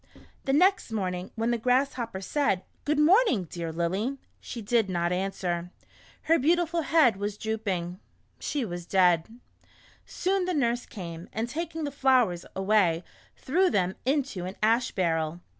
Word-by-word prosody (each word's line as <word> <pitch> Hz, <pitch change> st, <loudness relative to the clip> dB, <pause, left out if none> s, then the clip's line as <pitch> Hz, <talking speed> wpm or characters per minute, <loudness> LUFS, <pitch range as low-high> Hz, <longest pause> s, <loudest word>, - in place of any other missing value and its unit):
The 270 Hz, -, +1 dB
next 370 Hz, -, +3 dB
morning, 185 Hz, -3 st, -2 dB
when 230 Hz, +1 st, 0 dB
the 235 Hz, -, 0 dB
Grasshopper 250 Hz, -4 st, 0 dB
said, 195 Hz, -4 st, 0 dB
" -, -, -39 dB
Good 300 Hz, 0 st, +1 dB
morning, 325 Hz, -, +4 dB
dear 170 Hz, 0 st, -5 dB
Lily," 190 Hz, +11 st, -1 dB, 0.2 s
she 240 Hz, -, -7 dB
did 225 Hz, -1 st, +1 dB
not 175 Hz, -1 st, 0 dB
answer. 180 Hz, -2 st, -2 dB, 0.5 s
Her 330 Hz, +1 st, +3 dB
beautiful 335 Hz, +3 st, +2 dB
head 300 Hz, -10 st, +4 dB
was 205 Hz, +1 st, -3 dB
drooping. 195 Hz, -5 st, -3 dB, 0.4 s
She 285 Hz, -5 st, -2 dB
was 175 Hz, -3 st, -6 dB
dead. 180 Hz, -4 st, +3 dB, 0.8 s
Soon 380 Hz, 0 st, 0 dB
the 365 Hz, -1 st, -1 dB
nurse 245 Hz, -3 st, 0 dB
came, 170 Hz, -3 st, -8 dB
and 225 Hz, +2 st, -2 dB
taking 325 Hz, +4 st, -4 dB
the 290 Hz, -, -2 dB
flowers, 255 Hz, -10 st, +2 dB
away, 190 Hz, -4 st, +2 dB, 0.3 s
threw 360 Hz, +7 st, +2 dB
them 185 Hz, -, +1 dB
into 265 Hz, -9 st, -1 dB
an 185 Hz, +2 st, -6 dB
ash 230 Hz, +2 st, +3 dB
barrel. 165 Hz, -2 st, -1 dB
220 Hz, 150 wpm, -27 LUFS, 180-280 Hz, 0.8 s, morning